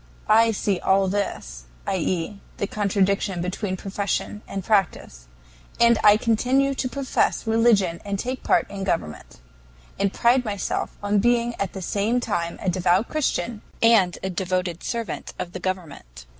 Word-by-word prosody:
"I 225 +1 +5
see 200 -3 0
all 195 0 +2
this - - -3 0.2
(i. 190 - 0
e., 185 +3 -2 0.2
the - - -1
contradiction 200 -2 0
between 185 +2 -3
profession 200 +2 -3
and 195 - -5
practice), 175 - 0 0.5
and 235 -1 +5
I 210 0 +7
continue 250 +5 +2
to 260 -1 -2
profess 275 -2 0
religion 220 -6 +2
and 200 -1 -3
take 255 +5 -4
part - - +2
in 195 -1 -5
government, 75 - -3 0.6
and 200 -1 +1
pride 245 +4 +3
myself 205 -4 -3
on 205 0 +2
being 240 +2 +2
at 195 -2 -2
the 190 - -6
same 210 +7 0
time 170 -8 -2
a - - -4
devout 185 +4 +2
Christian 235 - -1 0.2
and 220 -6 +4
a 190 - -2
devoted 180 -2 -2
servant 230 -2 -4
of 175 - -5
the 185 - -6
government. 160 - -6
200 Hz, 155 wpm, -24 LUFS, 185-225 Hz, 0.6 s, I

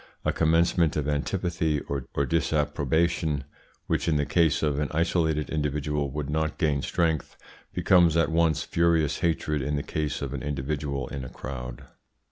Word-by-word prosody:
A - - +2
commencement 80 0 +3
of 75 -1 -1
antipathy 80 +1 0
or 70 -3 -4 0.2
disapprobation, 80 -1 +1 0.4
which - - -1
in 80 - +2
the 75 -1 +1
case 80 -2 +2
of 75 -2 +1
an 75 - 0
isolated 80 -2 +1
individual 75 -1 -1
would 75 +1 -4
not 80 +1 -1
gain 75 -3 +1
strength, 80 +2 -1 0.3
becomes 85 -3 +4
at 80 0 +2
once 80 -3 +2
furious 85 -3 +2
hatred 80 -3 0
in 75 +3 -1
the 70 - -2
case 75 -2 -2
of 70 -1 -4
an 70 - -4
individual 70 -1 -3
in 70 -1 -5
a 65 - -7
crowd. 60 -1 -7
75 Hz, 155 wpm, -27 LUFS, 70-80 Hz, 0.4 s, becomes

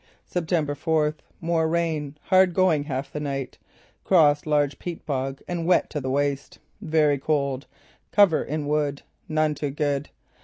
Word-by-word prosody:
"September 165 -4 -1
fourth: 155 0 0 0.2
More 165 -1 +1
rain. 160 -3 -1
Hard 185 -1 +4
going 170 -6 +3
half 135 -2 -4
the 150 - -3
night. 135 -3 -4 0.4
Crossed 150 -5 +4
large 145 -2 +1
peat 175 -2 -6
bog 135 -1 -3
and 170 -2 -3
wet 180 - +3
to 150 - -3
the 130 - -3
waist. 140 +1 -1 0.2
Very 155 -6 +2
cold. 140 -2 -1 0.4
Cover 200 -6 +5
in 150 0 -3
wood. 145 -1 -1 0.3
None 155 -1 +1
too 145 -1 -3
good. 145 0 -1
150 Hz, 150 wpm, -25 LUFS, 145-160 Hz, 0.4 s, Cover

